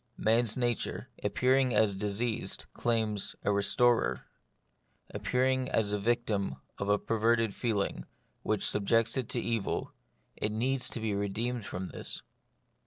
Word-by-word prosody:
Man's 115 +1 +2
nature, 120 -2 -1
appearing 130 -1 +2
as 105 -2 +3
diseased, 105 +3 -1
claims 110 -4 0
a 100 - +2
re 100 0 +2
storer; 120 +3 +2 0.9
appearing 130 +1 0
as 105 -2 +1
the 105 - 0
victim 105 - 0 0.2
of 100 - -2
a 105 - +4
perverted 115 0 +1
feeling, 100 - -1 0.4
which - - 0
subjects 115 +2 +2
it 130 -4 -2
to 120 - 0
evil, 115 -3 -2 0.4
it 105 - 0
needs 125 +4 0
to - - -4
be 110 -2 -1
redeemed 105 +3 -2
from 90 +2 -5
this. - - -6
115 Hz, 135 wpm, -30 LUFS, 100-120 Hz, 0.9 s, a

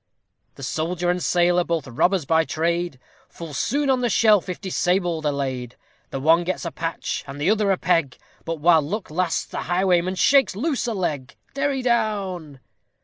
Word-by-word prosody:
_ - - -45
The 135 - -11
soldier 170 +7 -1
and 180 0 -2
sailor, 175 0 +2
both 165 -4 -2
robbers 165 +7 +1
by 160 +2 +3
trade, 170 -1 -1 0.3
Full 165 -3 -9
soon 280 - 0
on 260 -2 +2
the 245 - +1
shelf, 210 -2 +3
if 180 - -4
disabled, 175 -4 0
are - - +2
laid; 130 -3 -4 0.3
The 135 - -4
one 165 +5 +4
gets 185 +1 -3
a 170 - -3
patch, 165 0 -4
and 135 +1 -8
the 165 +7 +2
other 215 -2 +1
a 190 - +2
peg, 165 -8 0 0.3
But, 165 -1 -4
while 165 +1 +5
luck 185 +5 -5
lasts, 175 +1 0
the - - -6
highwayman 180 0 +1
shakes 270 0 +4
a - - -7
loose 280 -2 -1
leg! 165 - -3 0.2
_Derry 275 -1 -1
down. 195 - -1
175 Hz, 185 wpm, -23 LUFS, 160-195 Hz, 0.3 s, while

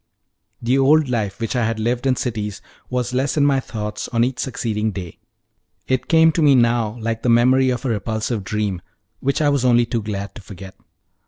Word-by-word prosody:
The 125 +3 +2
old 145 +1 +4
life, 105 -5 -2
which 115 +2 -3
I 120 - +1
had 115 0 -1
lived 120 +4 -1
in 130 - +3
cities, 105 -5 -3 0.3
was 125 -1 -2
less 135 +4 0
in 145 - +4
my 140 -2 +3
thoughts 105 -4 -5
on 115 -1 +1
each 125 +1 -2
succeeding 110 -4 -2
day; 95 -5 -7 0.7
it 130 -1 -1
came 160 0 +5
to 165 - -1
me 145 -3 +5
now 120 -2 +2
like 115 0 -3
the 125 - 0
memory 130 +3 +4
of 125 +1 -2
a - - 0
repulsive 110 0 -2
dream, 100 -1 -2 0.4
which 140 +3 0
I 145 - +4
was 140 -3 +1
only 120 -1 +4
too 115 -1 -2
glad 100 -2 -5
to - - -11
forget. 95 -1 -11
120 Hz, 200 wpm, -20 LUFS, 105-130 Hz, 0.7 s, came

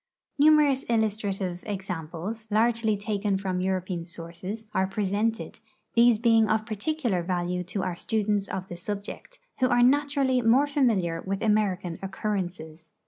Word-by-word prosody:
Numerous 295 -2 +5
illusti'ative 205 -5 -1
ex 195 -2 -4
amples, 180 +6 -5
largely 220 0 +2
taken 205 -1 -1
from 190 -2 -2
European 185 -2 -2
sources, 175 +5 -6
are 190 - +1
presented; 210 +3 -1 0.3
these 235 -1 +5
being 225 -1 +4
of 220 0 +1
particular 225 - -1
value 180 0 -2
to 185 +2 -3
our 185 -2 -2
students 205 0 -1
of 190 0 -5
the 175 - -7
subject, 205 - -6 0.2
who 255 - +4
are 245 -1 +4
naturally 275 -1 +3
more 245 +5 +4
familiar 220 - +1
with 195 0 -3
American 200 -5 0
occurrences. 180 -5 -4
205 Hz, 140 wpm, -27 LUFS, 185-230 Hz, 0.3 s, Numerous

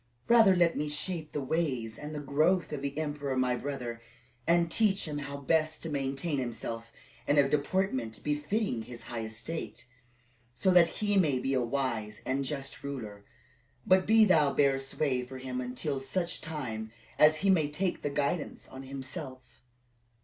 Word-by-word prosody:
"Rather 225 -5 +7
let 170 -2 +3
me 150 0 -1
shape 155 +1 -1
the 145 - -3
ways 130 -7 -1
and 150 +1 -7
the - - -3
growth 155 +5 +1
of 145 - -3
the 140 0 -3
emperor 145 -3 -2
my 125 -1 +2
brother, 125 -4 -5 0.5
and 170 0 +3
teach 200 -4 +2
him 150 -1 -3
how 140 0 -5
best 155 +2 0
to 165 - -4
maintain 140 +2 -1
himself 115 -1 -4 0.4
in 145 - +3
a 140 -1 +6
deportment 140 - -1
befitting 150 - -1
his 115 +1 -9
high 115 -2 -5
estate, 115 +9 -6 0.7
so 190 +8 +2
that 175 -2 +7
he 205 +3 +1
may 150 -7 +3
become 130 0 0
a - - 0
wise 115 -5 -2
and 135 +1 0
just 135 -1 -4
ruler; 110 -8 -6 0.6
but 185 -2 +4
do 220 0 +7
thou 155 -7 +4
bear 140 -2 +3
sway 135 -1 -1
for 130 +1 -9
him 130 -1 -4
until 130 +3 -2
such 170 +6 -1
time 115 -9 -4 0.3
as 150 +1 +7
he 195 - +6
may 155 -6 +3
take 175 +5 -1
the 145 - -1
guidance 145 +3 -2
on 130 - -9
himself." 135 -1 -8
140 Hz, 170 wpm, -30 LUFS, 130-165 Hz, 0.7 s, Rather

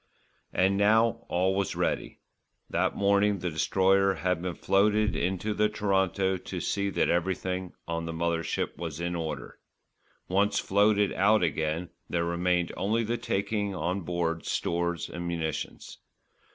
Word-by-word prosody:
And 95 +2 +2
now 110 +3 +3
all 95 +2 +2
was 95 0 -1
ready. - - -1 0.5
That - - +1
morning 100 0 +3
the 90 -1 -3
Destroyer 95 +4 +3
had 90 -2 -1
been 90 -1 -3
floated 105 +2 +2
into 95 +4 -1
the 105 0 +2
Toronto 95 -2 +1
to 90 0 -6
see 100 +3 -1
that - - +1
everything 90 +1 -1
on 85 0 -2
the - - -3
mother 85 0 0
ship - - -2
was 80 -3 -5
in 85 0 -2
order. 75 -6 -5 0.7
Once 100 +2 +2
floated 105 0 +3
out 105 +1 +4
again, 80 +2 -1 0.2
there 85 -1 0
remained 90 0 0
only 110 +5 0
the 115 +2 -1
taking 100 0 -1
on 90 +2 -1
board 85 -1 -2
stores 85 0 -1
and 85 0 -5
munitions. 80 -2 -4
95 Hz, 145 wpm, -28 LUFS, 85-100 Hz, 0.7 s, out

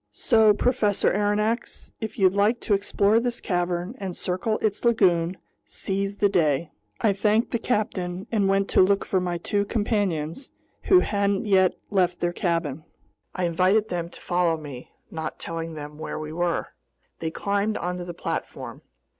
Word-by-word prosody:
So, 220 -3 +4
Professor 210 -3 +2
Aronnax, 210 +3 -1
if 220 -1 -5
you'd 190 -2 +4
like 210 +4 +2
to 210 - 0
explore 205 +2 +3
this 240 0 -2
cavern 175 +1 -1
and 190 -3 -5
circle 185 +5 -1
its 210 -2 -1
lagoon, 185 -7 +3 0.3
seize 195 +1 -3
the 205 - +4
day." 160 -5 +1 0.3
I 210 - +3
thanked 210 +4 +1
the 235 - 0
captain 195 -5 -2
and 205 -4 +2
went 195 0 +2
to - - +5
look 195 +1 +3
for 190 - +1
my 175 -1 -2
two 200 +4 0
companions, 205 - -1 0.4
who 370 -2 +6
hadn't 200 -1 0
yet 190 -3 +4 0.2
left 180 -3 +2
their 175 0 0
cabin. 165 -5 -1 0.5
I 185 - -2
invited 185 +5 +2
them 170 -1 -3
to - - -12
follow 175 -2 +1
me, 140 -5 -9 0.2
not 160 -1 -5
telling 165 -1 -5
them 150 0 -8
where 155 - -4
we 155 0 -6
were. 175 0 -1 0.5
They 160 - -2
climbed 200 +5 -1
onto 180 +1 -3
the 175 -1 -7
platform. - - -5
190 Hz, 165 wpm, -25 LUFS, 175-210 Hz, 0.5 s, who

